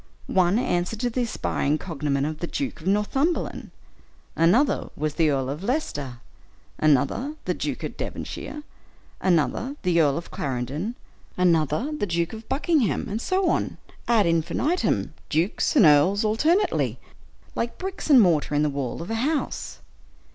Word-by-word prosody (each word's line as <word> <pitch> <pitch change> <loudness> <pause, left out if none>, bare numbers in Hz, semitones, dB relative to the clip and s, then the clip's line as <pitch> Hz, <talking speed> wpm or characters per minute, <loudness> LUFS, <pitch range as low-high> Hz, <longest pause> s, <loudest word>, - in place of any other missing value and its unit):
One 185 +1 +2
answered 180 -2 -1
to 245 -1 0
the 250 - -1
aspiring 155 -10 -1
cognomen 145 -5 -2
of 155 0 -4
the 170 - -3
Duke 275 - -4
of 165 - -7
Northumberland; 265 - 0 0.7
another 205 - +3
was 150 0 -1
the 160 -1 +2
Earl 135 -2 0
of 145 +5 -4
Leicester; 145 - -3 0.6
another, 155 - +2
the - - 0
Duke - - -4
of - - -5
Devonshire; 300 - -6 0.6
another, 185 - +1
the 175 -3 +3
Earl 140 -3 +2
of 165 - -7
Clarendon; 140 - -3 0.4
another, 170 - +2
the 205 - -2
Duke 170 +1 -1
of 220 0 -9
Buckingham; 285 - +1
and 220 +3 -3
so 375 +4 +1
on, - - 0 0.3
ad 225 -4 +4
infinitum, 170 - 0 0.2
dukes 165 - 0
and 230 - +7
earls 160 +8 +5
alternately, 315 - +2 0.6
like 235 0 -3
bricks 380 -2 -5
and 275 -4 +8
mortar 165 -7 +3
in 145 - +3
the 150 - +2
wall 140 +2 -3
of 175 - -7
a 225 0 -1
house. 300 +3 -2
180 Hz, 150 wpm, -25 LUFS, 150-250 Hz, 0.7 s, and